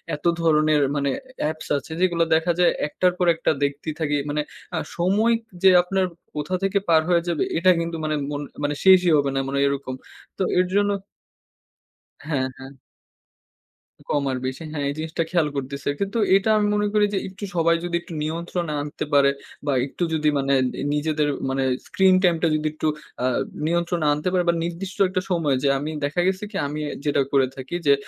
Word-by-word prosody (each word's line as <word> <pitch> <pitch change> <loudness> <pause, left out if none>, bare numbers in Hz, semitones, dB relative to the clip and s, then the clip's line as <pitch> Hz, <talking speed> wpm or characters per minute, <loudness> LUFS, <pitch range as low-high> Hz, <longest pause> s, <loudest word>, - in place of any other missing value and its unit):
এত 150 - -13 0.2
ধরনের 155 -2 +3
মানে 140 -1 0
এ 260 0 -8
অ্যাপস 155 +1 -3
আছে, 140 +3 -8
যেগুলো 175 -2 +3
দেখা 165 +2 +2
যায় 175 - +5 0.2
একটার 180 +4 +1
পর 180 - +1
একটা 165 - +1
দেখতেই 140 +2 -2
থাকি। 145 -2 0
মানে 150 +1 0 0.3
আ - - 0 0.2
সময় 200 +7 +3 0.3
যে 190 - +8
আপনার 190 +1 0 0.3
কোথা 150 +5 -2
থেকে 195 +1 +2
পার 160 -1 +6
হয়ে 175 -1 +4
যাবে, 170 -3 0
এটা 185 +3 +5
কিন্তু 165 0 -3
মানে 155 0 0 0.2
মন 145 0 -3 0.2
মানে 145 0 0
শেষই 185 -2 +6
হবে 140 -1 +1
না। - - +1
মানে 140 +1 -1
এরকম। 140 -2 -2 0.4
তো - - 0 0.2
এর 180 - +4
জন্য 205 0 +3 1.3
হ্যাঁ, 140 -4 0
হ্যাঁ। 135 0 -10 1.4
কম 145 -2 +1
আর 130 - -2
বেশি। 130 +5 -4
হ্যাঁ, 145 -2 -3
এই - - -2
জিনিসটা 160 +1 -2
খেয়াল 170 -4 +2
করতেছে। 140 +1 -4
কিন্তু 200 +3 -2 0.2
এটা 195 +3 +2
আমি 210 -1 +2
মনে 210 0 +1
করি 210 -1 +4
যে - - +1
একটু 195 +2 -12
সবাই 170 0 +3
যদি 175 -1 -2
একটু 170 - -11
নিয়ন্ত্রণে 170 +1 -3
আনতে 145 0 -5
পারে 140 -1 +6 0.4
বা, 145 - +1
একটু 140 +5 -4
যদি 155 -1 +1
মানে 135 0 +1 0.2
নি - - -7
নিজেদের 150 0 0 0.2
মানে 135 0 0 0.2
স্ক্রিন 190 -1 +4
টাইমটা 170 -2 +3
যদি 155 0 -1
একটু 155 0 -2 0.4
আ - - +2 0.4
নিয়ন্ত্রণে 170 -1 0
আনতে 150 +5 -1
পারে 180 -1 +2
বা, - - +4
নির্দিষ্ট 180 +3 -5
একটা 185 0 -1
সময় 160 -6 +2
যে, - - +3
আমি 150 +3 -4
দেখা 150 +5 0
গেছে 190 +1 -1
কি 200 - -4
আমি 150 +2 -4 0.3
যেটা 145 -1 +2
করে 135 -2 +4
থাকি 135 +5 -6
যে 140 - +7
160 Hz, 190 wpm, -23 LUFS, 145-180 Hz, 1.4 s, যে